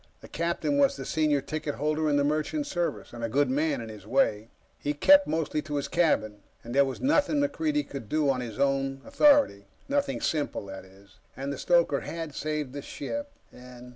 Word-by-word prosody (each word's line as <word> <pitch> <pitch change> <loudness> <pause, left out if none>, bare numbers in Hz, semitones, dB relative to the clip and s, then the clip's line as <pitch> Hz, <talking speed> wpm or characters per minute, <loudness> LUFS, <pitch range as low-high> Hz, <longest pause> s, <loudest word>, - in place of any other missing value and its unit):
The - - -11
captain 170 - -1
was 280 0 +4
the - - -6
senior 150 -3 +1
ticket 155 -1 -4
holder 155 +1 0
in 145 - +2
the 145 - +3
Merchant 155 - -1
Service, 175 - -3
and 120 -1 -7
a 115 - -1
good 140 +3 +2
man, 145 -1 0
in 115 - -7
his 105 -3 -10
day. 110 -3 +1 0.3
He 145 +1 -2
kept 290 - +6
mostly 155 -1 -1
to 150 -1 -5
his 140 - -1
cabin. 130 -12 +1 0.2
And 120 - -7
there 140 +1 +5
was 135 - -5
nothing 290 +2 +2
MacReidie 295 +1 0
could 135 -7 -8
do 155 -1 +1
on 130 -2 +1
his 115 -4 -7
own 135 -1 0
authority 285 - +4 0.2
nothing 280 -1 0
simple, 150 -9 -2
that 95 -1 -9
is. 95 +1 -20 0.2
And 135 +1 -3
the - - -6
stoker 170 -5 +3
had 165 -3 -6
saved 150 -2 -3
the 145 - -5
ship, 285 - -5 0.2
and 125 0 -12
145 Hz, 200 wpm, -27 LUFS, 130-170 Hz, 0.3 s, kept